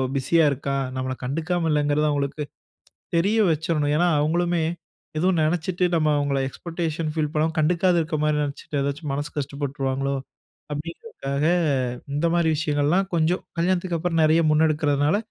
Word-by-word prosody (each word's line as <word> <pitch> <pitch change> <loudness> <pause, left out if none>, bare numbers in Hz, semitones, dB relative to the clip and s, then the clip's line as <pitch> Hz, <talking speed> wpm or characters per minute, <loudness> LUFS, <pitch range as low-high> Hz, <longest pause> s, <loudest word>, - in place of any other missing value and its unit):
பிஸியா 145 +5 +3
இருக்கான். 140 0 -2
நம்மள 130 0 -2
கண்டுக்காம 165 +6 -1
இல்லங்கறது 150 0 +2
அவுங்களுக்கு 145 +1 -1 0.7
தெரிய 195 +6 +2
வச்சிரணும். 155 -2 0
ஏன்னா 175 +2 +3
அவுங்களுமே 170 +2 +1 0.5
ஏதோ 180 +4 +2
நெனைச்சிட்டு 175 +3 0
நம்ம 155 -1 +2
அவுங்கள 140 -1 0
எக்ஸ்பெக்டேஷன் 165 +1 -3
ஃபீல் 155 -2 0
பண்ணாம 160 +1 +1
கண்டுக்காத 175 +3 +3
இருக்க 160 0 -2
மாதிரி 150 0 +2
நெனைச்சிட்டு 145 0 -3
ஏதாச்சும் 140 +2 -3
மனசு 145 +1 -3
கஷ்டப்பட்டுருவாங்களோ, 140 -1 -2 0.6
அப்பிடிங்கிறதுக்காக 150 - -4 0.7
இந்த 150 +4 +1
மாரி 170 -1 +2
விஷயங்கள் 145 -2 0
எல்லாம் 190 +4 +2
கொஞ்சம் 165 +3 +1 0.2
கல்யாணத்துக்கப்புறம் 175 -1 +1
நிறைய 160 +2 +4
முன்னெடுக்கிறதுனால 150 0 +2
155 Hz, 130 wpm, -24 LUFS, 145-170 Hz, 0.7 s, நிறைய